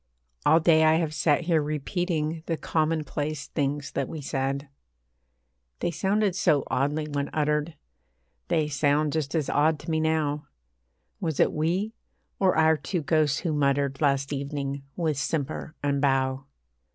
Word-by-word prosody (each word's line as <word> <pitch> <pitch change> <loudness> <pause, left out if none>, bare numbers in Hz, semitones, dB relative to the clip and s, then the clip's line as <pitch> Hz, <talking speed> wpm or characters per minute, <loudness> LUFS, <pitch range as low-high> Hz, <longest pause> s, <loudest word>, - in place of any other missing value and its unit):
All 160 - +6
day 160 -1 +5
I 155 0 +5
have 160 -2 0
sat 150 0 +2
here 165 -2 +2
repeating 155 +1 -2
The 165 - -1
commonplace 155 -2 -1
things 145 -1 -2
that - - -2
we 160 - -5
said. 140 0 -2 1.1
They 175 - -1
sounded 195 +2 +1
so 145 -7 +3
oddly 145 +5 0
when 145 -1 -2
uttered 150 +1 0 0.7
They 155 -2 +1
sound 145 +1 +1
just 155 -1 -2
as 155 -4 0
odd 155 +2 +2
to 165 - -5
me 160 - +1
now; 155 -2 0 0.7
Was 160 -5 -2
it - - +4
we, 180 +8 0 0.5
or 190 -4 +3
our 160 0 +5
two 150 +4 -3
ghosts 150 -2 +2
who 165 -4 -1
muttered 140 -1 +1
Last 140 -1 +1
evening, 140 0 -3
with 155 -5 -1
simper 155 +2 -3
and 140 -1 +1
bow? 135 -1 +1
150 Hz, 150 wpm, -26 LUFS, 140-160 Hz, 1.1 s, All